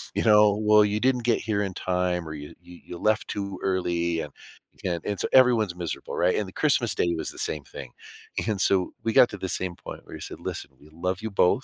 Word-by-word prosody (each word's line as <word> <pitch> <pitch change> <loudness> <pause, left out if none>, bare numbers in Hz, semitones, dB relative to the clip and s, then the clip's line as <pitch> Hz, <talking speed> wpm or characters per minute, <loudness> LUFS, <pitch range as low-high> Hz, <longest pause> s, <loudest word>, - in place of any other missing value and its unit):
You - - +1
know, 105 -1 +6
"Well, 105 0 +5
you 105 +1 -1
didn't 125 -2 +2
get 120 -1 +2
here 105 -2 -1
in 95 -2 -4
time, 90 -2 -1
or 80 - -6
you 75 -1 -9
you 90 -1 -14
you 85 - -8
left 110 +2 +1
too 100 -2 -4
early, 85 -3 0
and 75 - -8 0.4
you - - -29
can" 85 -2 -1
And 100 -2 -2
so - - +1
everyone's 120 -8 +5
miserable, 85 -2 -5
right, 90 +1 +2
and 105 - 0
the - - -10
Christmas - - +2
Day 85 - +1
was - - -3
the - - -14
same 75 -2 -2
thing. 65 -3 -10 0.6
And 105 -3 -1
so 95 -2 +2
we 115 -1 0
got 125 - +7
to 105 - -7
the 95 - -4
same 90 -2 -2
point - - -9
where - - -10
he - - -9
said, - - -8
"Listen, - - -5
we 75 - -18
love 90 +4 -3
you 110 -1 -4
both, 100 +7 +3
95 Hz, 250 wpm, -26 LUFS, 85-105 Hz, 0.6 s, got